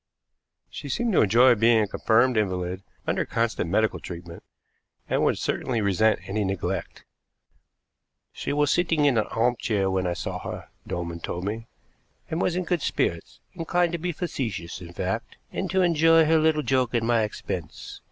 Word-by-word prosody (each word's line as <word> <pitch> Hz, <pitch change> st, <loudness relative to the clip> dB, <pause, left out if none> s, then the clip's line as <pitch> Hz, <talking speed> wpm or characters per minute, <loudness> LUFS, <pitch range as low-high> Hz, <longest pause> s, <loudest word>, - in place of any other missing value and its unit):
She 145 Hz, -, -7 dB
seemed 230 Hz, -, 0 dB
to -, -, +5 dB
enjoy 120 Hz, +5 st, +6 dB
being 115 Hz, +1 st, +4 dB
a 105 Hz, -, 0 dB
confirmed 120 Hz, +5 st, +2 dB
invalid 95 Hz, -3 st, -1 dB, 0.2 s
under -, -, 0 dB
constant 115 Hz, -7 st, -1 dB
medical 110 Hz, +4 st, +1 dB
treatment, 85 Hz, -1 st, -9 dB, 0.7 s
and -, -, +1 dB
would -, -, +2 dB
certainly 120 Hz, -3 st, -1 dB
resent 105 Hz, +2 st, +2 dB
any 105 Hz, +2 st, -1 dB
neglect. 95 Hz, -1 st, -3 dB, 1.3 s
"She -, -, -4 dB
was 145 Hz, 0 st, +2 dB
sitting 165 Hz, -4 st, +2 dB
in 130 Hz, -5 st, +4 dB
an 105 Hz, -, -1 dB
arm 120 Hz, +2 st, +1 dB
chair 100 Hz, -4 st, 0 dB
when 95 Hz, -1 st, 0 dB
I 90 Hz, -, 0 dB
saw -, -, -4 dB
her," -, -, -7 dB, 0.2 s
Dolman 85 Hz, -1 st, -4 dB
told 85 Hz, +1 st, -4 dB
me, 110 Hz, +3 st, -4 dB, 0.6 s
"and 160 Hz, +2 st, -1 dB
was 175 Hz, -, +1 dB
in 180 Hz, -, 0 dB
good 175 Hz, -2 st, -1 dB
spirits; -, -, -2 dB
inclined 175 Hz, 0 st, 0 dB
to 170 Hz, -, -3 dB
be 175 Hz, +2 st, -2 dB
facetious, 110 Hz, -, -4 dB
in 85 Hz, -1 st, -9 dB
fact, -, -, -4 dB
and -, -, -3 dB
to 190 Hz, -1 st, +2 dB
enjoy 165 Hz, -1 st, +5 dB
her 160 Hz, +1 st, +4 dB
little 155 Hz, -1 st, +2 dB
joke 130 Hz, -3 st, +1 dB
at 115 Hz, -, +2 dB
my 115 Hz, 0 st, +2 dB
expense. 95 Hz, -6 st, -5 dB
115 Hz, 170 wpm, -25 LUFS, 95-155 Hz, 1.3 s, enjoy